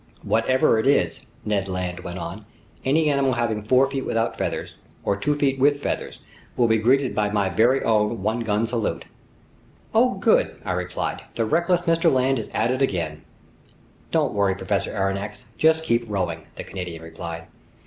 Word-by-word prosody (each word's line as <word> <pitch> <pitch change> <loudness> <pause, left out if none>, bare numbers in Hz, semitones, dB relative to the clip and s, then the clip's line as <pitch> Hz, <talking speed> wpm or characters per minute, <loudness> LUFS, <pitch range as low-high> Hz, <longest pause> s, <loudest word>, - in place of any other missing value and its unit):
"Whatever 115 0 +3
it 110 - 0
is," 140 -2 +1 0.2
Ned 100 -2 0
Land 90 -2 -3
went 90 0 -6
on, 90 +5 -6 0.4
"any 155 +4 +2
animal 140 -2 +2
having 115 -3 -1
four 125 +5 +4
feet 135 -1 -3
without 115 0 -1
feathers, - - -3 0.3
or 100 - +1
two 145 +9 0
feet 135 -2 +1
with 145 +2 +4
feathers, - - -4 0.4
will 120 - +4
be 110 -1 +3
greeted 130 +4 +2
by 105 -1 +1
my 100 -2 +1
very 115 +9 +3
own 105 -1 +1
one 110 +3 0
gun 110 -1 0
salute." 115 -2 -2 0.9
"Oh - - +4
good!" - - +2
I - - -1
replied. - - -3
"The 115 - 0
reckless 170 +7 +2
Mr. 165 -1 +3
Land 130 0 +2
is 110 - -6
at 115 +3 0
it 130 +1 -1
again!" 85 - -1 0.9
"Don't - - +1
worry, 100 -2 +2
Professor 100 +1 -1
Aronnax, 100 +3 -3
just 160 0 +3
keep 120 -6 +1
rowing!" 90 -5 -2
the - - -6
Canadian 90 -4 -6
replied. 80 0 -7
110 Hz, 170 wpm, -23 LUFS, 95-130 Hz, 0.9 s, four